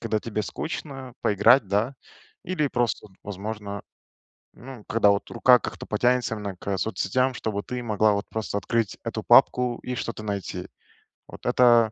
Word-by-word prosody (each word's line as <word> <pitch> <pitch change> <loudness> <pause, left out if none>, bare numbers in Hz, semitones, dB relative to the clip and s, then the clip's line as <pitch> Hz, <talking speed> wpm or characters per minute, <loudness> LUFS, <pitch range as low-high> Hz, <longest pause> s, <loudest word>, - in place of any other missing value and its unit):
когда 115 -2 0
тебе 105 -2 -3
скучно, 135 +1 -6
поиграть, 110 +4 +5
да. 105 +7 0 0.5
Или 180 -5 0
просто, 120 -4 -1
вот 95 - -25
возможно, 100 0 -6 0.7
ну, 125 -3 -11
когда 110 -2 +4
вот 100 - -1
рука 125 -1 +5
как-то - - -6
потянется 120 +1 +1
вновь 100 -3 -6
к 100 -1 -2
соцсетям, 110 +6 0
чтобы 105 -3 -3
ты 125 -1 -5
могла 110 -2 +2
вот 100 0 -3
просто 110 -2 -2
открыть 115 +1 -1
эту - - -3
папку 125 -1 +4
и 125 - -4
что-то 115 -3 -4
найти. 100 -2 -4 0.6
Вот - - -13
это 120 -3 +5
110 Hz, 155 wpm, -25 LUFS, 100-125 Hz, 0.7 s, поиграть